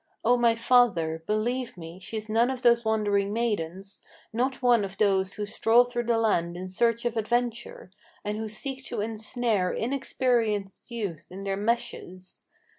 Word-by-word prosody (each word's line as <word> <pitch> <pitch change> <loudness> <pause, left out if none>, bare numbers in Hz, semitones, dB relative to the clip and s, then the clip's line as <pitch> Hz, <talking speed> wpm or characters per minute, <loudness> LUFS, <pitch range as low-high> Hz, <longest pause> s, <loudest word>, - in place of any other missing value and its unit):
O 245 +2 +5
my 235 -2 +3
father! 220 -10 +3
believe 235 +2 -1
me, 165 +1 -9
she's 215 +3 -5
none 230 +3 +2
of 260 -2 -4
those 235 -1 +5
wandering 205 -2 +1
maidens, 195 -4 -3 0.3
Not 255 +3 -1
one 240 -3 +5
of 195 0 -6
those 195 -2 +2
who 210 - -4
stroll 225 +3 +4
through 245 -1 -3
the 230 0 +2
land 175 -6 +1
in 185 +1 -6
search 230 +4 +1
of 240 -1 0
adventure, 240 - -2 0.3
And 210 +1 -2
who 220 - -3
seek 265 +5 -5
to 240 -3 -3
ensnare 220 -2 -1
inexperienced 230 -5 -1
youth 200 -9 -5
in 195 +2 -7
their 195 0 -1
meshes. 195 -4 -3
220 Hz, 160 wpm, -27 LUFS, 195-240 Hz, 0.3 s, O